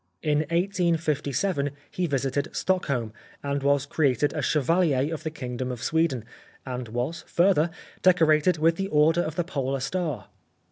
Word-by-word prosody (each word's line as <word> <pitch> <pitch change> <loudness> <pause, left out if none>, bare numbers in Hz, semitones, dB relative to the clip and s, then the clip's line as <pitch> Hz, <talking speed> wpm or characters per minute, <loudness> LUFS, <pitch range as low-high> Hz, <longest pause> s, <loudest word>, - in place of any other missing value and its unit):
In 150 -2 +2
1857 170 -3 0 0.2
he 180 -1 -1
visited 140 0 -1
Stockholm, 140 -12 -1 0.3
and 140 0 -1
was 140 0 +2
created 145 -2 +1
a - - -2
Chevalier 155 -1 +2
of 155 - -5
the 160 - -3
Kingdom 125 -4 -5
of 125 0 -6
Sweden, 150 -6 0 0.4
and 125 -2 -5
was, 120 +9 -3
further, 175 -2 +3 0.3
decorated 165 -2 +4
with 165 +2 +2
the 195 - -1
Order 160 0 +3
of 160 -2 -4
the 175 - 0
Polar 135 -5 -2
Star. 150 - -3
150 Hz, 145 wpm, -26 LUFS, 135-170 Hz, 0.4 s, decorated